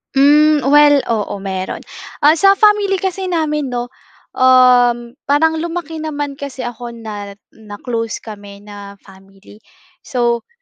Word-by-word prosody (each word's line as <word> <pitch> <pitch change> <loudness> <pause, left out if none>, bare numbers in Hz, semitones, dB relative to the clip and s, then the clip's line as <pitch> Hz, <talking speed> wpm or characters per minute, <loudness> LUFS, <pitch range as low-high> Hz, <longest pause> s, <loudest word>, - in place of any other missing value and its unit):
Hmm, 295 +2 +4
well, 290 0 +5
oo, 210 -2 -2
meron. 190 -1 -5 0.4
Ah, 305 +2 +6
sa 395 0 +5
family 415 -1 +3
kasi 380 0 -3
namin 300 -5 -1
'no, 245 0 -5 0.4
um, 250 -2 +3 0.2
parang 320 +3 +2
lumaki 330 -1 -5
naman 290 -3 -5
kasi 270 -2 -7
ako 240 0 -7
na 205 -3 -8 0.2
na 210 -2 -12
close 230 -3 -4
kami 205 -2 -11
na 205 -1 -11
family. 195 +2 -18 0.5
So 240 -2 -1
255 Hz, 130 wpm, -16 LUFS, 220-305 Hz, 0.5 s, Ah